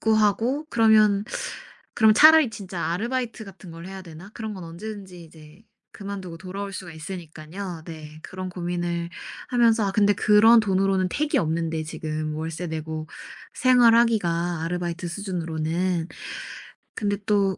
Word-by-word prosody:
구하고 220 +6 +2
그러면 215 -3 +4 0.7
'그럼 220 -2 +5
차라리 310 -1 +8
진짜 190 -5 -5
아르바이트 230 +5 -2
같은 190 -2 -12
걸 165 +1 -9
해야 190 0 -7
되나?' 175 +3 -12
그런 220 -2 -5
건 185 -3 -8
언제든지 185 0 -8
이제 155 +3 -16 0.3
그만두고 195 -4 -7
돌아올 195 +2 -6
수가 180 -3 -7
있으니깐요. 165 +1 -7
네 155 -2 -9
그런 185 0 -6
고민을 175 -1 -3 0.4
하면서 230 -3 +3
아 195 - -1
근데 205 0 +4
그런 220 +3 +6
돈으로는 195 -2 +1
턱이 300 0 0
없는데 160 0 -1
지금 155 0 -4
월세 165 +2 -4
내고 160 0 -5 0.5
생활하기가 225 -9 +3
아르바이트 175 +1 -3
수준으로는. 170 -1 -2 0.9
근데 205 -1 -1
또 200 -3 +2
185 Hz, 325 characters per minute, -24 LUFS, 165-215 Hz, 0.9 s, 차라리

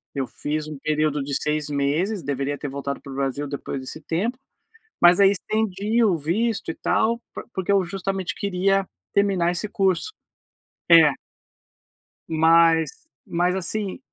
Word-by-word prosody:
eu 135 -1 -1
fiz 150 +3 -4
um 150 - -7
período 150 0 0
de 140 +1 -5
6 150 -1 -1
meses, 155 +9 0
deveria 140 +1 -2
ter 145 - -5
voltado 140 0 -4
para 140 - -10
o - - -7
Brasil 140 +1 -2
depois 140 -1 -5
desse 130 +4 -8
tempo, 210 +12 -2 0.6
mas 175 0 +7
aí 195 -1 +7
estendi 215 +2 0
o 195 -6 +3
visto 200 +10 -1
e - - -4
tal, 230 +1 +1
por - - -7
porque 190 0 -2
eu 200 -1 +4
justamente 190 +1 -3
queria 195 0 +1 0.3
terminar 190 -4 +2
esse 180 +4 -3
curso. 195 - 0 0.8
É. 165 -3 +8 1.2
Mas 165 -1 +4 0.3
mas, 175 +2 0
assim, 190 +2 -3
170 Hz, 150 wpm, -23 LUFS, 150-195 Hz, 1.2 s, É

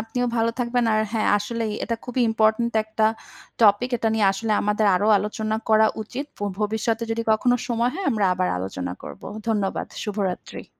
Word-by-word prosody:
আপনিও 245 +2 -2
ভালো 230 0 +2
থাকবেন। 245 0 +1
আর 215 - +3
হ্যাঁ, 220 -1 +1
আসলেই 225 +1 -3
এটা 230 - -2
খুবই 250 +1 -2
ইম্পোর্টেন্ট 220 +1 +2
একট 220 +1 -9 0.6
টপিক। 215 +4 +4
এটা 225 - 0
নিয়ে 215 -2 +3
আসলে 215 +3 -2
আমাদের 210 +1 +1
আরো 190 +3 +1
আলোচনা 215 +1 -2
করা 220 0 +5 0.2
উচিত। 255 +6 -6 0.3
ভবিষ্যতে 220 +2 0
যদি 230 0 -1
কখনো 245 +3 +3
সময় 235 +1 +1
হয় 380 +1 -3
আমরা 215 -5 +1
আবার 180 0 0
আলোচনা 90 -1 -4
করব। - - -9 0.3
ধন্যবাদ। 205 -3 -1 0.2
শুভরাত্রি। 200 -4 -4
220 Hz, 165 wpm, -23 LUFS, 210-235 Hz, 0.6 s, করা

